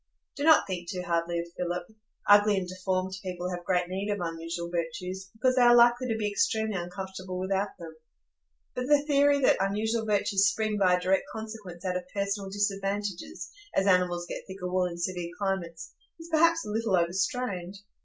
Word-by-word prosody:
Do 285 - -4
not 320 +1 +6
think 175 -3 -5
too 180 -2 -4
hardly 170 0 0
of 170 - -2
Philip. 175 0 -2 0.4
Ugly 205 0 +6
and 185 -2 -2
deformed 185 0 -2
people 180 -1 -4
have 175 -1 -5
great 180 0 +1
need 190 +3 -3
of 205 0 -1
unusual 170 0 -4
virtues, 180 +3 -4
because 255 +3 +2
they 255 - +4
are 240 0 +7
likely 240 +1 +5
to 225 -2 -1
be 210 -1 -1
extremely 220 +1 0
uncomfortable 185 +1 -5
without 195 +2 -1
them; 165 -2 -10 0.8
but 250 0 -3
the 295 0 +4
theory 285 -1 +4
that 255 - +4
unusual 215 +4 0
virtues 200 -1 +3
spring 215 0 -1
by 185 -2 +5
a - - -1
direct 185 +2 +1
consequence 215 -5 -8
out 180 -1 0
of 180 0 -7
personal 200 0 -2
disadvantages, 195 -2 -3 0.2
as 195 - +3
animals 180 -2 +2
get - - -5
thicker 190 -1 -6
wool 180 0 +1
in 170 -1 -7
severe 175 0 -3
climates, 175 -5 -3 0.3
is 330 +1 -10
perhaps 330 +1 +4
a 210 - -5
little 220 -2 +1
overstrained. 185 +2 -1
190 Hz, 185 wpm, -28 LUFS, 180-215 Hz, 0.8 s, are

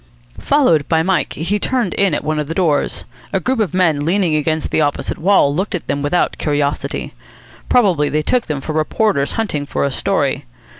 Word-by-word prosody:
Followed 170 - +2
by 160 0 +3
Mike, 190 +1 0
he 190 +7 -1
turned 245 -7 -1
in 195 -6 +2
at - - -3
one 155 0 -1
of 150 - -3
the 165 - -4
doors. 165 -6 0 0.3
A 195 - +1
group 255 +7 -1
of 210 -5 0
men 170 -6 +2
leaning 175 0 +1
against 155 +1 -1
the - - +2
opposite 145 -1 -1
wall 170 -5 +3
looked 190 +6 -2
at 175 - -5
them 140 - -2
without 145 +5 0
curiosity. 145 -1 -2 0.6
Probably 185 -12 +3
they 155 +1 0
took 245 +9 0
them 145 -3 -3
for 155 - -4
reporters 155 -1 0
hunting 155 -11 -2
for - - -1
a 140 - -1
story. - - -1
160 Hz, 195 wpm, -18 LUFS, 150-195 Hz, 0.6 s, by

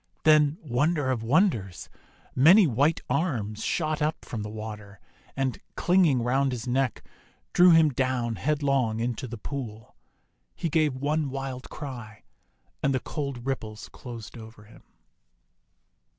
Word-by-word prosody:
Then, 155 -1 +5
wonder 145 +1 +1
of 120 -3 -1
winders! 115 - +1 0.5
many 175 +10 +7
white 145 +4 +2
arms 125 - -1
shot 155 -2 -1
up 155 +1 -1
from 115 - -5
the 105 - -5
water, 105 -2 -8 0.4
and, 135 -2 -1 0.2
clinging 175 -8 +3
around 135 +3 +1
his 120 -2 -5
neck, 130 0 0 0.5
drew 180 +1 +7
him 160 -2 +6
down 130 -3 -1
head 150 0 -1
long 130 -6 +1
into 120 +2 -2
the 120 0 -7
pool. 110 -3 -7 0.6
He 165 - -2
gave 155 -3 +2
one 145 +2 -1
wild 135 -1 -5
cry, 120 -7 -8 0.6
and 140 -1 +1
the - - +1
cold 140 -3 -5
ripples 110 -5 -4
closed 120 -1 -9
over 110 -1 -12
him. 105 - -17
130 Hz, 135 wpm, -27 LUFS, 115-150 Hz, 0.6 s, many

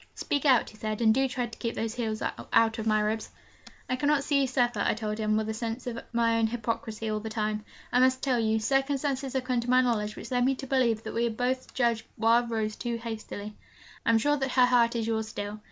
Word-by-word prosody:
'Speak 285 +1 -2
out,' 255 -5 +4
he - - -17
said, 215 -1 -3
'and 220 -2 +5
do 270 +3 +2
try 255 -1 -2
to 230 -2 -11
keep 230 -1 -3
those 225 0 -2
heels 220 -3 -3 0.3
out 225 0 +4
of 220 - -3
my 215 0 +3
ribs.' 215 +1 -1 0.6
'I 255 - -1
cannot 290 0 +2
see 280 -1 +2
you 270 - +2
suffer,' 240 -4 +1
I - - +2
told 215 -1 -3
him, 215 0 +1
with 220 0 -1
a 220 - -2
sense 230 +2 -4
of 235 -2 -4
my 230 -1 +2
own 225 - +3
hypocrisy 225 -1 -3
all 215 - -1
the 220 +1 -6
time. 215 -1 -2 0.3
'I 250 - +5
must 260 0 +3
tell 255 -3 +2
you 220 -1 +2
circumstances 270 +2 0
have 265 -1 0
come 255 -1 0
to 235 +1 -4
my 255 0 +6
knowledge 215 -4 0
which 230 - -9
lead 245 -1 +2
me 265 +2 +2
to 270 - -7
believe 245 -4 +1
that - - -6
we 235 +1 +1
have 225 -2 -3
both 255 +1 -2
judged 235 -3 +1
Wild 230 +2 +3
Rose 215 -2 -1
too 240 -1 -3
hastily. 220 -2 -6 0.5
I - - 0
am 230 - +5
sure 290 +6 +2
that 270 -2 -2
her 250 -1 +6
heart 240 -1 +3
is 230 -1 -1
yours 220 -1 -1
still. 205 -1 -5
230 Hz, 250 wpm, -28 LUFS, 220-255 Hz, 0.6 s, my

